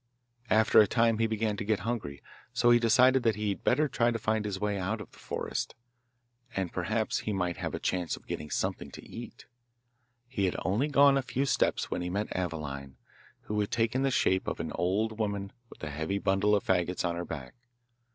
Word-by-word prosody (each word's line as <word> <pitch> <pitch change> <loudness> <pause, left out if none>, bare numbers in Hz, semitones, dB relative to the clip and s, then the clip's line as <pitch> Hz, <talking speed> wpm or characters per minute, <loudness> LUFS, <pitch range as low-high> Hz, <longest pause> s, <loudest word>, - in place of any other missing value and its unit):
After 110 +1 +5
a 105 - +4
time 115 +1 +2
he 115 - +3
began 110 -1 -1
to - - -3
get 105 -2 0
hungry, 105 -10 -4 0.3
so 120 - +4
he 120 - +6
decided 125 +3 +5
that 115 -3 +2
he 105 0 -1
had 100 - -3
better 150 +5 +3
try 120 -3 +2
to 115 - -1
find 110 -1 0
his 100 -2 -3
way 105 -1 -1
out 100 +4 -2
of 105 - -9
the - - -18
forest, - - -4 0.8
and 95 -3 -2
perhaps - - 0
he 105 - -3
might 90 -3 -1
have - - -3
a - - -4
chance 90 -2 -1
of - - -17
getting 75 - -5
something - - -2
to - - -10
eat. - - -9 0.8
He 115 -6 -1
had 90 - 0
only 105 - +1
gone 140 -1 +5
a - - 0
few 135 +1 -1
steps - - +1
when - - -1
he 90 - -3
met 100 +4 -2
Aveline, 75 -6 -4 0.4
who 105 0 -3
had 105 - 0
taken 115 +3 +1
the 135 - +2
shape 95 -7 +2
of - - -3
an 80 -1 -3
old 105 +5 0
woman 100 -2 -2 0.2
with - - -15
a 75 - -3
heavy 80 +7 -2
bundle 100 +2 +2
of 100 - 0
faggots 90 -1 0
on 85 - -2
her 85 - -3
back. 70 -6 -7
105 Hz, 215 wpm, -30 LUFS, 90-115 Hz, 0.8 s, he